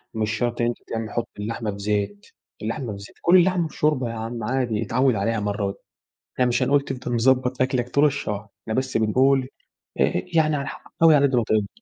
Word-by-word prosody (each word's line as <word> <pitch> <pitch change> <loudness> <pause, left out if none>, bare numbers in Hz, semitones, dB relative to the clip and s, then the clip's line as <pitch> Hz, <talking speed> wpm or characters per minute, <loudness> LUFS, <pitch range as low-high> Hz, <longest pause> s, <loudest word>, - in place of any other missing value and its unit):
مش 110 -1 0
شرط 120 +1 -1
إن 120 - +2
أنتَ 120 - -2
تعم 115 -1 -3
تحط 120 +1 -3
اللحمة 110 0 -3
في 100 - -8
زيت، 100 0 -2 0.4
اللحمة 115 +2 -3
في 100 - -8
زيت 100 - -12
كُل 180 +2 +6
اللحمة 180 -2 +3
بشوربة 150 -6 0
يا 115 - -5
عم 115 +1 -5
عادي 120 -4 0
اتعوِّد 130 +3 +2
عليها 110 +3 0
مرّة 105 0 -2
وات 100 - -6 0.5
يعني 125 -1 +3
مش 125 +2 +1
هنقول 140 +2 +4
تفضل 125 -3 -4
مضبط 130 +1 +2
أكلك 130 -2 0
طول 140 - +3
الشهر، 105 -8 -3
إحنا 110 - -4
بس 130 0 -1
بنقول 130 +4 +3 0.5
آآ - - +2
يعني 155 -2 +3
على 140 - -3
ح - - -9 0.2
حاول 165 -1 +7
على 140 -1 +5
قد 130 -2 0
ماتقدر. 110 - 0
120 Hz, 210 wpm, -23 LUFS, 110-135 Hz, 0.5 s, حاول